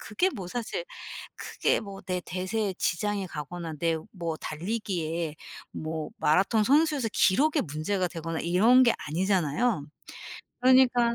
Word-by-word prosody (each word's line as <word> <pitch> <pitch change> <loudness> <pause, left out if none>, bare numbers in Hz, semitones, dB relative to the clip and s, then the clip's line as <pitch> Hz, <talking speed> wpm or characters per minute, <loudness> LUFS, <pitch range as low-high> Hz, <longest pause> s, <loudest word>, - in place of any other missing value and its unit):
그게 360 - 0
뭐 190 - -7
사실 245 - -3 0.5
크게 - - 0
뭐 200 -2 -8
내 180 -1 -2
대세에 185 +2 -2
지장이 200 +2 -1
가거나 160 +2 -6
내 165 0 +1 0.2
뭐 170 -4 -3
달리기에 170 -3 -3 0.4
뭐 155 -1 -4
마라톤 195 +8 +3
선수에서 290 -1 +3
기록에 290 - +3
문제가 170 +5 -1
되거나 165 -1 -4
이런 215 +10 +5
게 240 -2 +5
아니잖아요. 180 - 0 0.7
그러니까 250 -2 +5
185 Hz, 285 characters per minute, -28 LUFS, 165-230 Hz, 0.7 s, 이런